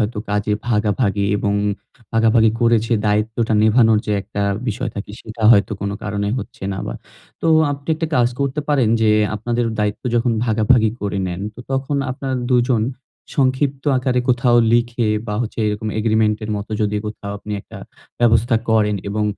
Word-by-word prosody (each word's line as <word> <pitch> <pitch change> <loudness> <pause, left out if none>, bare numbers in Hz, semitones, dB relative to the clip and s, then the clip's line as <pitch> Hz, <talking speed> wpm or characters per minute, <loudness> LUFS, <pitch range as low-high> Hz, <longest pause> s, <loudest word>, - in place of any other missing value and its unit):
হয়তো 105 +1 -1
কাজে 105 +1 0 0.2
ভাগাভাগি 105 -2 +1
এবং 100 0 0 0.6
ভাগাভাগি 115 0 +4
করে 115 0 +4
যে 115 - +1
দায়িত্বটা 110 +2 0
নেভানোর 110 0 +4
যে 105 - 0
একটা 100 +1 -4 0.3
বিষয় 115 +3 -3
থাকে, 100 - -6
সেটা 110 0 -9
হয়তো 100 -2 +4
কোনো 100 0 -2
কারণে 100 0 -2
হচ্ছে 100 - -9
না 95 - -5
বা। - - -4 0.5
তো - - -1 0.3
আপনি 140 +1 -9
একটি 160 +1 -2
কাজ 120 -1 +4
করতে 140 +1 -1
পারেন, 135 -6 +3
যে 110 - +4 0.3
আপনাদের 120 +3 -1
দায়িত্ব 105 0 -1
যখন 120 0 +2
ভাগাভাগি 110 0 +3
করে 100 -1 -2
নেন, 90 0 -4
তো 120 - -10
তখন 135 +2 -1
আপনার 135 0 -3 0.2
২ 125 - +5
জন 115 -4 +2 0.5
সংক্ষিপ্ত 135 0 +1
আকারে 125 -1 0
কোথাও 125 -1 +3 0.2
লিখে 120 -1 +1 0.2
বা 105 - -3
হচ্ছে 115 - -6
এরকম 105 +1 -2
Agreement 110 -1 +2
এর 110 - -5
মতো 100 +2 -6
যদি 105 0 0
কোথাও 105 -1 -6
আপনি 105 - -7
একটা - - -12 0.4
ব্যবস্থা 115 0 +3
করেন 105 -2 +3
এবং 105 +1 -1
110 Hz, 170 wpm, -19 LUFS, 105-120 Hz, 0.6 s, ২